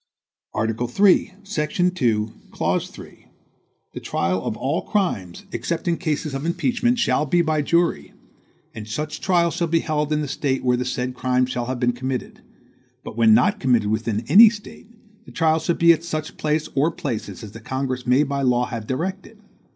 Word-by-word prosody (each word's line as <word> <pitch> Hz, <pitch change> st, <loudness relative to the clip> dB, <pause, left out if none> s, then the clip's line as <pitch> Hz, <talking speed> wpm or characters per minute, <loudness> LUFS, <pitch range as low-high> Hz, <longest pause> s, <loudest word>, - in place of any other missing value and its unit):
Article 110 Hz, +2 st, -1 dB
3, 190 Hz, +6 st, +3 dB
section 180 Hz, -1 st, 0 dB
2, 115 Hz, -10 st, 0 dB, 0.2 s
clause -, -, -1 dB
3 -, -, -14 dB, 0.7 s
"The -, -, -6 dB
trial 90 Hz, +2 st, -1 dB
of 110 Hz, -, -3 dB
all 140 Hz, +6 st, -1 dB
crimes, 105 Hz, -, -2 dB
except 160 Hz, +10 st, -3 dB
in 170 Hz, -1 st, +1 dB
cases 155 Hz, -3 st, -2 dB
of 135 Hz, +1 st, -4 dB
impeachment, 240 Hz, +9 st, 0 dB
shall 190 Hz, -9 st, +1 dB
be 175 Hz, +4 st, +3 dB
by 155 Hz, -2 st, +1 dB
jury; 165 Hz, -, 0 dB, 0.6 s
and 110 Hz, -1 st, -8 dB
such 150 Hz, +7 st, -4 dB
trial 175 Hz, -3 st, +2 dB
shall 170 Hz, 0 st, -1 dB
be 165 Hz, 0 st, +2 dB
held 150 Hz, -1 st, -1 dB
in 150 Hz, 0 st, +1 dB
the 150 Hz, -, -3 dB
State 135 Hz, -1 st, -2 dB
where 125 Hz, -1 st, +3 dB
the 125 Hz, +1 st, -2 dB
said 125 Hz, 0 st, -2 dB
crimes 125 Hz, 0 st, 0 dB
shall 120 Hz, -2 st, -3 dB
have 130 Hz, -1 st, -3 dB
been 120 Hz, -1 st, +1 dB
committed; 130 Hz, +1 st, -5 dB, 0.6 s
but -, -, -8 dB
when 110 Hz, -1 st, +5 dB
not 210 Hz, -, +2 dB
committed 120 Hz, -, +2 dB
within 110 Hz, 0 st, -1 dB
any 220 Hz, +3 st, +9 dB
State, 210 Hz, -2 st, -11 dB, 0.4 s
the -, -, -13 dB
trial 160 Hz, -1 st, +2 dB
shall 165 Hz, +1 st, 0 dB
be 170 Hz, 0 st, +6 dB
at 165 Hz, 0 st, -4 dB
such 155 Hz, -2 st, -4 dB
place 155 Hz, 0 st, -1 dB
or 145 Hz, +4 st, +2 dB
places 115 Hz, -, -5 dB
as 105 Hz, -, -8 dB
the 115 Hz, -, -10 dB
Congress 130 Hz, +1 st, -4 dB
may 130 Hz, +4 st, +4 dB
by 140 Hz, -1 st, -2 dB
law 125 Hz, -2 st, +2 dB
have 115 Hz, -3 st, -6 dB
directed." 190 Hz, +10 st, -4 dB
140 Hz, 185 wpm, -22 LUFS, 120-170 Hz, 0.7 s, any